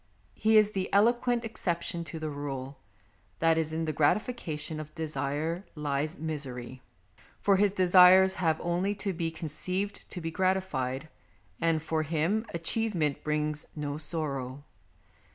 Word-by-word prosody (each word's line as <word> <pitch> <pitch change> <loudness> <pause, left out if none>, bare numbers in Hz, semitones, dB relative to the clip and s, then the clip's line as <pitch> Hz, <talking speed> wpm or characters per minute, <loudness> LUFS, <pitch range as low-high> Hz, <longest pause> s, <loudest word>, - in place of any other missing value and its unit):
He 220 0 +4
is 215 -1 +5
the 190 -2 -3
eloquent 240 +3 +3
excep 175 -6 -2
tion 170 -1 -3
to 165 - -7
the 155 -1 -4
rule 140 -1 -5 0.6
that 165 0 +3
in 160 +1 -1
the 155 - -1
gratification 155 - 0
of 155 0 -8
desire 155 +2 -2
lies 150 +3 -2
misery, 130 -5 -5 0.6
for 200 -1 +3
his 205 +1 +4
desires 185 0 +7
have 160 -3 +2
only 180 +4 0
to 195 -1 -3
be 165 -1 -1
conceived 180 +5 -4
to 180 - -6
be 165 -1 -4
gratified, 160 -8 0 0.5
and 165 -2 +1
for 160 0 0
him 170 +8 0
achievement 170 -3 -1
brings 150 0 -1
no 145 -1 -3
sorrow. 140 -4 -3
160 Hz, 135 wpm, -29 LUFS, 150-190 Hz, 0.6 s, desires